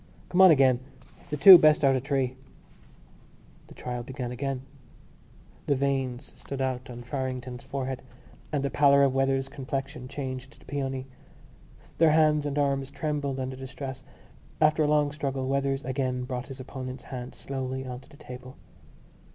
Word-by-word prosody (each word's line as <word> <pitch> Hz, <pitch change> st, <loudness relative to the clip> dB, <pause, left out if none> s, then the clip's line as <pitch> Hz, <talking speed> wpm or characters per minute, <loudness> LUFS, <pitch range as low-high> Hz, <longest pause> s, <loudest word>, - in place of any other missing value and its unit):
"Come 180 Hz, -, +3 dB
on 190 Hz, -, +10 dB
again. 135 Hz, -5 st, +5 dB, 0.5 s
The 150 Hz, -, -2 dB
two 180 Hz, +5 st, +11 dB
best 155 Hz, -1 st, +5 dB
out 135 Hz, -1 st, +5 dB
of 130 Hz, -, -1 dB
three." 135 Hz, -2 st, 0 dB, 1.3 s
The -, -, -14 dB
trial 125 Hz, -1 st, -4 dB
began 125 Hz, 0 st, -5 dB
again. 135 Hz, +1 st, -3 dB, 1.0 s
The 140 Hz, -, +3 dB
veins 135 Hz, -2 st, -2 dB
stood 140 Hz, -, -7 dB
out 130 Hz, -1 st, -2 dB
on 120 Hz, 0 st, -8 dB
Farrington's 130 Hz, -1 st, -4 dB
forehead, 135 Hz, -1 st, -4 dB, 0.5 s
and 145 Hz, -3 st, 0 dB
the 140 Hz, -, -1 dB
pallor 140 Hz, -1 st, +5 dB
of 135 Hz, -2 st, +3 dB
Weathers' 135 Hz, 0 st, +1 dB
complexion 135 Hz, -1 st, -5 dB
changed 130 Hz, 0 st, -6 dB
to -, -, -20 dB
peony. 135 Hz, -2 st, -3 dB, 0.9 s
Their 160 Hz, -2 st, +6 dB
hands 155 Hz, -2 st, +3 dB
and 145 Hz, 0 st, -3 dB
arms 135 Hz, -2 st, +1 dB
trembled 145 Hz, -2 st, -2 dB
under 130 Hz, 0 st, -3 dB
the 130 Hz, 0 st, -8 dB
stress. 130 Hz, 0 st, -7 dB, 0.6 s
After 155 Hz, 0 st, +4 dB
a 150 Hz, -, +3 dB
long 150 Hz, -1 st, +3 dB
struggle 135 Hz, -3 st, -3 dB
Weathers 135 Hz, 0 st, 0 dB
again 130 Hz, -1 st, -1 dB
brought 125 Hz, 0 st, -4 dB
his 135 Hz, -1 st, -9 dB
opponent's 130 Hz, -1 st, -7 dB
hand 125 Hz, 0 st, -6 dB
slowly 130 Hz, -1 st, -4 dB
on 125 Hz, -1 st, -6 dB
to 130 Hz, -, -19 dB
the 145 Hz, -, -16 dB
table. 130 Hz, -2 st, -10 dB
135 Hz, 160 wpm, -27 LUFS, 130-140 Hz, 1.3 s, two